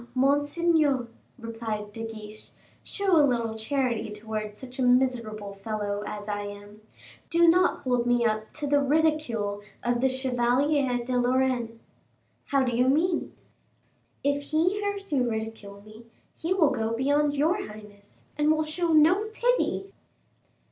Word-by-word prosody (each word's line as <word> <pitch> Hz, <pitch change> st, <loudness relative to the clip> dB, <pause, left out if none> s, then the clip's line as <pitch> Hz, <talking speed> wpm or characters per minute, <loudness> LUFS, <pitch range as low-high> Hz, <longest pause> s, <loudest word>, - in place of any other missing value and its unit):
monseigneur," 290 Hz, 0 st, +2 dB, 0.3 s
replied 225 Hz, -3 st, -5 dB
De 225 Hz, -, -6 dB
Guiche, 215 Hz, -1 st, -9 dB, 0.3 s
"show 390 Hz, -4 st, +1 dB
a -, -, +7 dB
little 235 Hz, -5 st, +1 dB
charity 235 Hz, 0 st, -1 dB
towards 215 Hz, 0 st, -5 dB
such 260 Hz, 0 st, -10 dB
a -, -, +1 dB
miserable 245 Hz, -5 st, +1 dB
fellow 205 Hz, 0 st, -3 dB
as 210 Hz, 0 st, -6 dB
I 205 Hz, -1 st, -2 dB
am: 205 Hz, +1 st, -9 dB, 0.5 s
do 340 Hz, 0 st, +4 dB
not 360 Hz, +2 st, +4 dB
hold 245 Hz, -2 st, +1 dB
me 245 Hz, -1 st, +3 dB
up 215 Hz, -1 st, -1 dB
to 300 Hz, -, -4 dB
the 285 Hz, 0 st, +3 dB
ridicule 280 Hz, -9 st, 0 dB, 0.2 s
of 240 Hz, 0 st, 0 dB
the 265 Hz, -, +3 dB
Chevalier 260 Hz, 0 st, +1 dB
de 255 Hz, 0 st, -2 dB
Lorraine." 245 Hz, -2 st, 0 dB, 0.7 s
"How 275 Hz, -1 st, +2 dB
do 245 Hz, -2 st, -1 dB
you 250 Hz, +2 st, +3 dB
mean?" 330 Hz, +5 st, +1 dB, 0.9 s
"If 285 Hz, 0 st, 0 dB
he 340 Hz, +7 st, +1 dB
hears 405 Hz, -2 st, -4 dB
you 255 Hz, -4 st, +2 dB
ridicule 220 Hz, -3 st, -6 dB
me, 215 Hz, +2 st, -14 dB, 0.3 s
he 330 Hz, -, -5 dB
will 340 Hz, -6 st, +4 dB
go 225 Hz, 0 st, -1 dB
beyond 285 Hz, +3 st, +1 dB
your 330 Hz, +8 st, +1 dB
highness, 210 Hz, -1 st, -14 dB
and 295 Hz, 0 st, +3 dB
will 310 Hz, 0 st, +3 dB
show 330 Hz, +2 st, -1 dB
no 335 Hz, +7 st, +5 dB
pity." 440 Hz, -3 st, -1 dB
250 Hz, 145 wpm, -27 LUFS, 220-300 Hz, 0.9 s, a